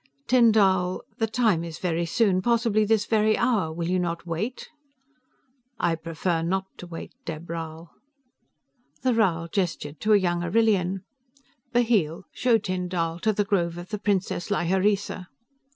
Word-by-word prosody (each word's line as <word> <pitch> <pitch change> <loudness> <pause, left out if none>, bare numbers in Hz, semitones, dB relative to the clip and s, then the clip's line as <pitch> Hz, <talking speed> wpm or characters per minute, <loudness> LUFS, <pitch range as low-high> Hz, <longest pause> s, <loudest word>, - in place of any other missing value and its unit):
"Tyn 240 -2 +5
Dall, 190 -4 +2 0.2
The 225 - +2
Time 220 -7 +2
is 165 -1 -6
very 170 -1 -1
soon, 190 0 +2
possibly 230 -1 +2
this 215 -1 +2
very 215 -1 +2
hour. 220 -10 +1
Will 165 +1 -3
you 185 +1 +1
not 170 -1 -3
wait?" 185 +9 -4 1.1
"I 170 - +2
prefer 165 +1 -2
not 190 +3 -1
to 180 - -8
wait, 165 -1 -8
Dheb 160 0 -6
Rhal." 165 0 -6 1.1
The 255 -1 +3
Rhal 175 -7 +1
gestured 165 -6 -2
to 215 0 +3
a - - +8
young 175 -3 0
Arrillian. 195 -1 +1 0.7
"Bheel, 220 - +1
show 245 -2 +3
Tyn 185 -3 -3
Dall 165 -2 -2
to 215 +5 +2
the 205 0 0
Grove 175 -4 0
of 175 +1 -8
the 210 -1 -4
priestess 195 -4 -1
Lhyreesa." 190 0 0
185 Hz, 150 wpm, -25 LUFS, 170-215 Hz, 1.1 s, a